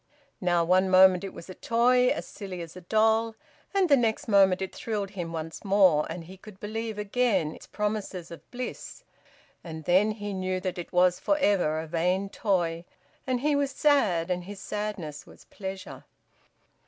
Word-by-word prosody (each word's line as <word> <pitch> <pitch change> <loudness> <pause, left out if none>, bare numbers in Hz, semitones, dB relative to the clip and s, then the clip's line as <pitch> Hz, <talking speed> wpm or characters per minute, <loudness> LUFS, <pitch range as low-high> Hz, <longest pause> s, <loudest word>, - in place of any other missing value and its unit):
Now, 175 -2 +2
one 185 +2 +3
moment 185 0 +6
it 195 - -5
was 170 - -11
a 185 - -8
toy 250 +4 +3
as - - -2
silly 190 -3 -8
as 165 0 -9
a 185 - -9
doll, 220 +4 +2 0.4
and 390 -2 +2
the 290 - +6
next 230 -4 0
moment 195 -3 +5
it 190 -1 -4
thrilled 205 -4 -3
him 175 -4 -5
once 160 0 -6
more, 190 -7 +4
and 175 - -6
he 185 +3 -12
could 195 0 -14
believe 220 +1 -4
again 210 -6 0
its - - -13
promises 205 -5 -3
of 165 -4 -12
bliss 250 0 -7 0.6
and 160 -2 -8
then 185 +6 +3
he 205 -1 -5
knew 185 -1 -2
that 185 -1 -4
it 175 - -7
was 180 0 +3
for 300 - +1
ever 190 - +2
a 160 - -4
vain 180 +4 0
toy, 175 -6 -1 0.4
and 255 -2 0
he 295 +1 +2
was 285 -1 +1
sad, 205 - +2
and 180 -1 -2
his 200 0 -8
sadness 195 -9 -5
was - - -16
pleasure. 190 -1 -8
190 Hz, 180 wpm, -27 LUFS, 175-220 Hz, 0.6 s, moment